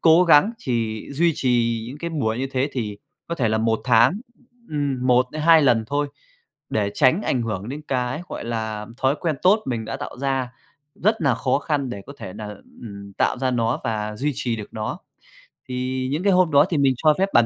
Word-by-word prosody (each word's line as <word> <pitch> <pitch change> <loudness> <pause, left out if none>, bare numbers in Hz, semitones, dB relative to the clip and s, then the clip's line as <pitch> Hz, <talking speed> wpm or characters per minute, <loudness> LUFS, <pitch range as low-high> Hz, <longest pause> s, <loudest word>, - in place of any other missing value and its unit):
cố 165 +2 +6
gắng 170 +6 +6
chỉ 115 -3 -2
duy 165 +4 +2
trì 115 -3 +1
những 140 +4 -8
cái 170 +1 -4
buổi 115 -8 -1
như 135 - -1
thế 135 +2 +1
thì 105 -5 -3 0.3
có 170 - -3
thể 120 -8 0
là 110 - +1
1 110 0 +1
tháng, 125 - +4 0.5
ừm, 140 -4 -1
1-2 150 +6 +4
lần 120 -5 +3
thôi, 145 +1 0 0.6
để 100 -2 0
tránh 155 +9 +3
ảnh 125 -3 0
hưởng 105 -1 -4
đến 145 +3 -6
cái, 125 +3 -1
gọi - - -6
là, 110 -2 -3
thói 135 +1 +2
quen 160 -4 -1
tốt 205 +4 +5
mình 115 -3 -2
đã 135 - -4
tạo 140 -2 -7
ra 135 -2 -1 0.4
rất 215 +4 +1
nà 140 -7 +3
khó 130 +4 +1
khăn 145 -3 -2
để 100 -4 -6
có 140 - -9
thể 90 - -7
nà, 105 0 -7 0.4
ừm, 100 -3 -9
tạo - - 0
ra 130 0 0
nó 115 -1 0
và 105 -1 -2
duy 145 +7 0
trì 120 -2 -2
được 105 - -7
nó. 110 -1 -4 0.7
Thì 130 +1 -2
những 155 +6 -1
cái 200 -2 +4
hôm 180 -2 +4
đó 145 +1 +6
thì 165 - 0
mình 135 -2 +4
cho 155 +2 +4
phép 195 - +2
bản 120 -1 +6
130 Hz, 215 wpm, -23 LUFS, 115-145 Hz, 0.7 s, cố